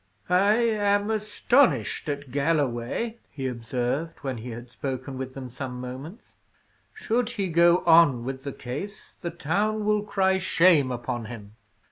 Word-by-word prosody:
"I 200 +4 +5
am 210 -3 +2
astonished 215 - +2
at 140 -2 -4
Galloway!" 145 - -1
he 135 -2 -6
observed, 125 +6 -2
when 135 -3 -3
he 120 +3 -7
had 120 +1 -8
spoken 130 +1 -5
with 130 0 -6
them 130 -2 -7
some 125 0 -6
moments. 130 - -9 0.5
"Should 245 - -1
he 200 -6 -2
go 170 +2 +4
on 160 -8 +6
with 130 +1 -5
the 140 - -4
case, 145 +13 -7
the 170 - -3
town 205 +7 -1
will 210 0 +2
cry 190 -2 +1
shame 165 -7 +4
upon 120 -1 -4
him." 110 -3 -9
150 Hz, 145 wpm, -26 LUFS, 125-200 Hz, 0.5 s, on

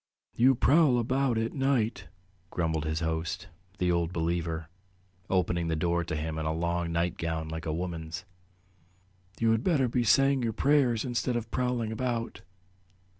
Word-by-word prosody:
"You 130 +3 +4
prowl 140 0 +4
about 130 +1 +1
at 115 0 -1
night," 125 -7 0 0.4
grumbled 80 -3 -1
his 80 +1 -1
host, 80 +1 -2 0.3
the 90 -2 +1
Old 85 -1 0
Believer, 80 -1 -2 0.6
opening 85 -2 +1
the 80 - 0
door 85 +2 0
to 85 -1 -4
him, 80 +1 -3
in 80 - -3
a 80 - 0
long 85 +1 -1
nightgown 85 -1 -1
like 80 +1 -5
a - - 0
woman's. 85 +1 -4 1.1
"You 115 -1 +3
had 115 +1 +1
better 145 -8 +2
be 120 +1 0
saying 135 +3 +4
your 115 -2 -1
prayers 135 -3 +2
instead 125 0 -1
of 115 -1 -3
prowling 125 -3 -1
about." 120 0 -3
90 Hz, 155 wpm, -29 LUFS, 80-120 Hz, 1.1 s, You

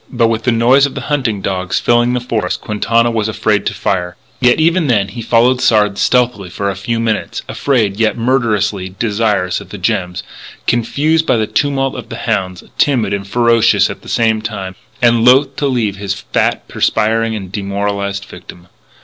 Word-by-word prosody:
But 120 -3 +2
with 115 0 -2
the 120 - +3
noise 125 +5 +4
of 140 - -11
the - - -4
hunting 115 -9 -1
dogs 95 -1 -1
filling 120 +1 +2
the 125 - 0
forest, 110 -6 -2
Quintana 115 +2 +1
was 110 -2 -1
afraid 110 - 0
to - - -1
fire. 90 0 -2 0.2
Yet, 125 +1 +3
even 165 0 +2
then 105 -6 +1
he 120 - -7
followed 120 +3 +2
Sard 105 -2 +2
stealthily 125 -7 +1
for 100 +2 -2
a - - -6
few 115 +5 -3
minutes, 115 -2 -2
afraid 110 -8 0
yet 110 0 +1
murderously 105 -6 0
desirous 105 -5 0
of - - -13
the - - -7
gems, 90 0 -2 0.4
confused 150 +7 +1
by - - +3
the 110 - +1
tumult 135 +1 0
of - - -8
the - - -6
hounds, 95 -1 -2 0.2
timid 120 -8 +2
and 100 -1 -3
ferocious 115 +1 +3
at - - -10
the - - -12
same 110 -2 +1
time, 100 -4 -5 0.3
and 120 -1 +4
loath 135 +3 +4
to 145 - 0
leave 115 -7 -1
his 100 -1 -3 0.2
fat, - - 0
perspiring, 115 +1 0
and 95 -4 -7
demoralised 100 0 -3
victim. 90 0 -13
115 Hz, 185 wpm, -15 LUFS, 100-120 Hz, 0.4 s, noise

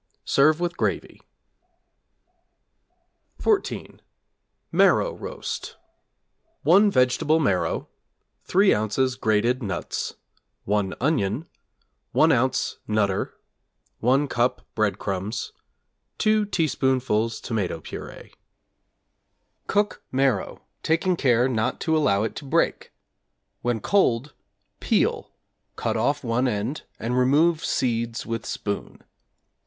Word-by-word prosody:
Serve 155 +3 +4
with 175 0 -2
gravy. - - -2 2.2
=14. 425 -3 -1 0.7
Marrow - - +4
Roast= - - -6 0.9
1 200 +5 +6
vegetable 135 +1 +2
marrow, 100 - 0 0.6
3 195 +2 +4
ozs. 130 +5 +1
grated 115 +3 +1
nuts, 95 -6 -4 0.5
1 100 -1 0
onion, 130 -1 0 0.7
1 160 +1 +5
oz. 130 0 +1
'Nutter,' 100 -3 0 0.6
1 135 +5 +2
cup 120 -1 0
breadcrumbs, 105 -1 -2 0.6
2 215 -1 +2
teaspoonfuls 130 - 0
tomato 100 -7 -2
purée. - - -9 1.3
Cook 205 +1 0
marrow, 135 0 0 0.2
taking 170 +3 +1
care 125 -5 +3
not 110 -4 -1
to 160 -1 +1
allow 110 -10 +2
it 110 - -3
to 145 - -7
break; 135 - 0 0.7
when 120 -1 0
cold, 140 - +1 0.5
peel, - - 0 0.4
cut - - -2
off 140 +6 0
one 120 +2 +1
end 115 +5 -3
and 120 +2 -2
remove 155 +6 +3
seeds 115 -2 -1
with 115 -1 -4
spoon. 100 -1 -5
125 Hz, 95 wpm, -24 LUFS, 110-155 Hz, 2.2 s, 1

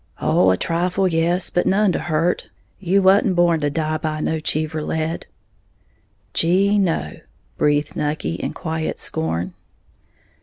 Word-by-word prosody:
'"] - - -32
"Oh, 95 - +3
a 95 - +3
trifle, 180 - 0
yes, 170 +1 +1
but 175 - +1
none 200 0 +3
to - - -1
hurt, 165 +2 -1 0.3
you 195 +1 +2
wa'n't 190 0 +4
born 175 -2 +3
to 145 -1 0
die 155 +1 -2
by 155 -1 -3
no 160 +1 -1
Cheever 155 0 -1
lead." 160 +2 -3 1.1
"Gee, 195 +5 +3
no," 165 - -1 0.4
breathed 145 0 +1
Nucky, 150 - -2
in 85 - -4
quiet 160 -1 -3
scorn. 85 +3 -2
160 Hz, 145 wpm, -21 LUFS, 150-180 Hz, 1.1 s, wa'n't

